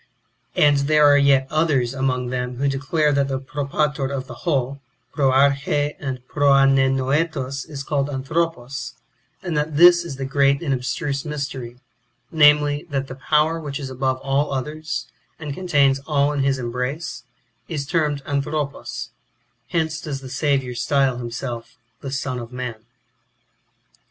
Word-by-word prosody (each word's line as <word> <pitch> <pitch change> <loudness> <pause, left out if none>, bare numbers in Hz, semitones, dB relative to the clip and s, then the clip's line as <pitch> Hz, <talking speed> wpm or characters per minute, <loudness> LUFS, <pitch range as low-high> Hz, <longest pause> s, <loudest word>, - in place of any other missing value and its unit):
And 145 -1 +5
there 150 -1 +5
are 145 0 +7
yet 140 -1 +4
others 145 -6 +1
among 130 -2 -1
them 125 0 -3
who 140 +3 0
declare 145 +3 +1
that 140 -1 +2
the 135 -1 -1
Propator 140 +1 -1
of 135 -1 -4
the - - -9
whole, 140 -4 -1 0.3
Proarche, 140 +1 +2
and 130 -3 -5
Proanennoetos 135 0 +2
is 140 -3 -6
called 140 -1 -1
Anthropos; 135 -3 -2 0.5
and 175 -4 -3
that 150 0 -1
this 175 +1 +7
is 170 -5 -6
the 135 0 -4
great 140 +2 +2
and 140 -4 0
abstruse 135 +3 -2
mystery, 135 -5 -5 0.5
namely, 150 -1 +4
that 135 -2 -2
the - - -5 0.2
Power 155 +2 +3
which 145 -2 -5
is 135 -2 -6
above 130 0 0
all 140 +2 +1
others, 150 +4 -3 0.3
and 150 -3 -5
contains 140 -6 +2
all 145 -2 +2
in 145 - 0
his 135 0 +2
embrace, 125 +6 -4 0.5
is 150 -5 -3
termed 150 -2 0
Anthropos; 140 -4 -3 0.6
hence 160 -2 -1
does 140 -4 -5
the 130 - -9
Saviour 135 -2 0
style 130 +1 +1
himself 120 0 -6 0.2
the - - -8
^' - - -7
Son 135 -2 -2
of 120 0 -8
man." 125 -3 -6
140 Hz, 145 wpm, -22 LUFS, 130-150 Hz, 0.6 s, are